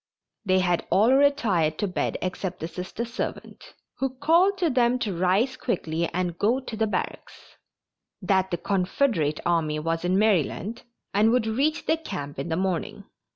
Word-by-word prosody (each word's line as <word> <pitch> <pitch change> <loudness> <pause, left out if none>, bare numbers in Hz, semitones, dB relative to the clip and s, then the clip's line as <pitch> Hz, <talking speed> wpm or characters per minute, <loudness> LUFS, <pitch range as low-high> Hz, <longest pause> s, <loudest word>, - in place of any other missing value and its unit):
They 185 -2 +2
had 175 -2 0
all 210 +8 +4
retired 225 - +2
to 205 - -1
bed 175 -6 -2
except 185 0 -3
the 160 - -4
Sister 185 +6 -5
servant, 235 +2 -6 0.2
who 265 -1 -2
called 340 +8 +3
to 345 -5 +1
them 250 -1 +3
to 210 -7 -3
rise 190 +9 +2
quickly 170 -10 -2
and 175 -1 -2
go 235 +6 +2
to 250 -3 -7
the 220 0 0
barracks; - - -5 0.6
that 190 -1 +1
the 175 - -1
Confederate 180 - 0
army 160 -3 +1
was 165 +2 -2
in 180 +1 +2
Maryland 210 +1 +1 0.3
and 210 +3 +4
would 240 -1 +2
reach 275 +8 0
the 320 - +2
camp 160 - -6
in 140 - -4
the 160 - -1
morning. 190 +3 -2
195 Hz, 165 wpm, -25 LUFS, 175-245 Hz, 0.6 s, all